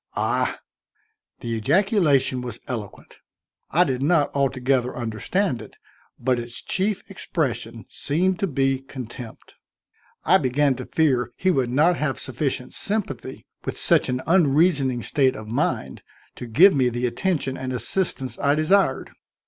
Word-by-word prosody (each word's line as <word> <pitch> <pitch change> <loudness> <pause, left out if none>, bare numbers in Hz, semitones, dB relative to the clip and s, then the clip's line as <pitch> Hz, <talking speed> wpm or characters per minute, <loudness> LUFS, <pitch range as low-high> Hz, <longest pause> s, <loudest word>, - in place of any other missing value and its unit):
"Ah!" - - 0 0.8
The 115 - -4
ejaculation 150 - +2
was 120 -3 -6
eloquent. 110 -6 -7 0.5
I 175 +4 +4
did 130 -5 -2
not 150 0 +2
altogether 130 -2 0
understand 120 - -1
it, 110 - -12 0.4
but 125 0 +1
its 120 0 -7
chief 200 +1 -1
expression 120 - -3
seemed 180 +5 -1
to 195 - +1
be 135 -3 +1
contempt. 125 -3 -9 0.7
I 190 +4 +5
began 140 +1 +2
to - - -7
fear 125 -7 +1
he 185 - +2
would 130 -6 +1
not 155 +8 +3
have 145 -3 -1
sufficient 130 -1 -3
sympathy 200 - -4 0.2
with - - -4
such - - +2
an 125 +1 -2
unreasoning 145 -6 +3
state 135 -3 +2
of 110 - -8
mind 115 - -2 0.3
to 125 - -8
give 175 - +6
me 130 -3 +2
the 120 +1 -2
attention 135 +2 -1
and 130 -1 -4
assistance 130 - -2
I 145 0 +2
desired. 155 -2 +2
135 Hz, 140 wpm, -23 LUFS, 125-165 Hz, 0.8 s, give